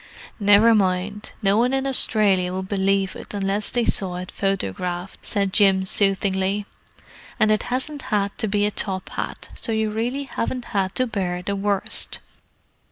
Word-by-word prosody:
"Never 205 +3 +6
mind, 200 +1 0
no 195 +1 +4
one 250 +3 +2
in 270 0 -1
Australia 205 -8 +3
would 190 +1 -4
believe 195 -1 +1
it - - -8
unless 200 +1 -1
they 240 -2 +1
saw 185 -3 0
it 180 0 -6
photographed!" 180 - -3
said 200 -3 0
Jim 195 -2 +4
soothingly. 195 0 +1 0.7
"And 215 - +4
it 215 - +3
hasn't 270 +3 -1
had 200 -3 0
to 220 - +1
be 205 0 +2
a 210 - +1
top 190 -2 -2
hat, - - -5
so 230 - -5
you 220 -1 0
really 240 +6 -2
haven't 250 -2 -3
had 195 -1 0
to 255 - +2
bear 185 -6 -2
the 200 +2 -2
worst." 200 0 -1
200 Hz, 165 wpm, -23 LUFS, 190-220 Hz, 0.7 s, Never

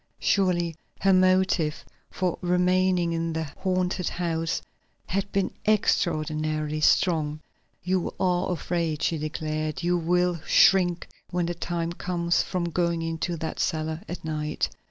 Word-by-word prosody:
Surely 175 -4 +1 0.3
her 195 0 +4
motive 185 -4 +2 0.2
for 180 -3 -1
remaining 180 -1 +2
in 165 0 -1
the 160 0 -1 0.2
haunted 185 -1 0
house 165 -1 -1 0.5
had 195 +1 -2
been 195 -1 0 0.2
extraordinarily 155 -6 +1
strong. 155 -3 +2 0.4
"You 185 0 0
are 180 0 +1
afraid," 165 -2 -2
she 165 - +1
declared. 155 +1 -3
"You 175 0 +2
will 175 0 +1
shrink, 175 -3 +4 0.2
when 180 -1 0
the 175 - -2
time 170 0 -3
comes, 170 -1 0
from 175 -2 -2
going 170 0 0
into 165 +1 -2
that 160 0 -4
cellar 155 0 -1
at 175 - -6
night." 150 -1 -2
170 Hz, 130 wpm, -26 LUFS, 160-180 Hz, 0.5 s, her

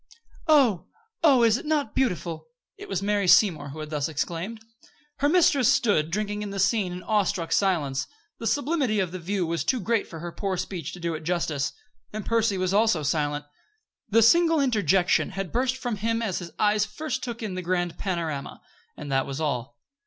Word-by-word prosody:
"Oh! 265 - +4 0.4
Oh, 270 -7 +6
is 225 0 +4
it - - -9
not 295 -8 0
beautiful!" 175 -10 -1 0.3
It 405 +1 -11
was 190 - -2
Mary 205 -1 +1
Seymour 165 -7 +4
who 155 +3 -7
had 155 0 -7
thus 150 0 -1
exclaimed. 170 +8 -3 0.6
Her 285 +1 +2
mistress 290 -7 +4
stood, 210 - +2
drinking 210 +3 -2
in 210 - -4
the 200 - -6
scene 195 -1 +1
in 180 +1 -7
awestruck 200 -5 0
silence. 155 -9 +1 0.3
The 230 - -3
sublimity 280 -6 +1
of 185 -3 -1
the 185 - -6
view 185 +1 -1
was 165 -3 -2
too 255 +9 +1
great 225 +2 0
for 165 - -9
her 170 +2 -6
poor 195 +1 -3
speech 175 -4 -4
to 180 - -9
do 170 -1 -2
it 160 0 -6
justice. 155 -5 -1 0.4
And 215 - -6
Percy 225 -3 +1
was 185 0 0
also 205 -7 +3
silent. 145 0 -1 0.6
The 225 +2 +5
single 330 +6 +5
interjection 195 - +2
had 195 -2 -3
burst 255 +2 0
from 245 -4 -3
him 225 +3 -1
as 195 -6 -1
his 175 -2 -7
eyes 210 0 +3
first 260 +5 -4
took 235 -2 -5
in 210 -4 -3
the 185 - -3
grand 175 -1 -2
panorama, 165 -7 -3 0.4
and 145 -2 -7
that 135 0 +1
was 135 +1 -5
all. 140 -5 -3
195 Hz, 195 wpm, -26 LUFS, 165-230 Hz, 0.6 s, Oh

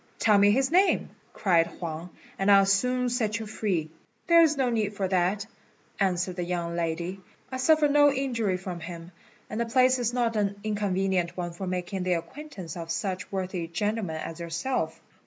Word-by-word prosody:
"Tell 210 -2 +4
me 200 0 +6
his 260 +6 +2
name," 375 +3 +3 0.2
cried 170 -5 +2
Huang, 170 0 -6 0.3
"and 195 +1 +2
I'll 195 -1 +7
soon 250 +6 +2
set 225 -4 0
you 225 - -5
free." 190 -7 -2 0.3
"There 335 -1 +6
is 310 -3 +4
no 260 -3 +1
need 215 -3 -1
for 195 -1 -1
that," 185 +3 +1 0.5
answered 185 -1 0
the 180 - -1
young 170 -1 -3
lady; 170 +3 -2 0.3
"I 260 - -3
suffer 305 +3 +4
no 290 0 +5
injury 235 -8 -1
from 180 -1 -6
him, 170 +1 -8 0.4
and 215 +2 -3
the 235 - -1
place 255 +2 +4
is 240 -1 0
not 240 -2 0
an 200 -1 0
inconvenient 195 -4 0
one 175 -1 -3
for 185 +3 -6
making 180 +1 -3
the 180 0 +1
acquaintance 180 - -6
of 165 -1 -7
such 185 +2 -3
worthy 185 -3 -3
gentlemen 200 0 -2
as 160 +1 -6
yourself." 170 -1 -2
195 Hz, 180 wpm, -27 LUFS, 175-235 Hz, 0.5 s, I'll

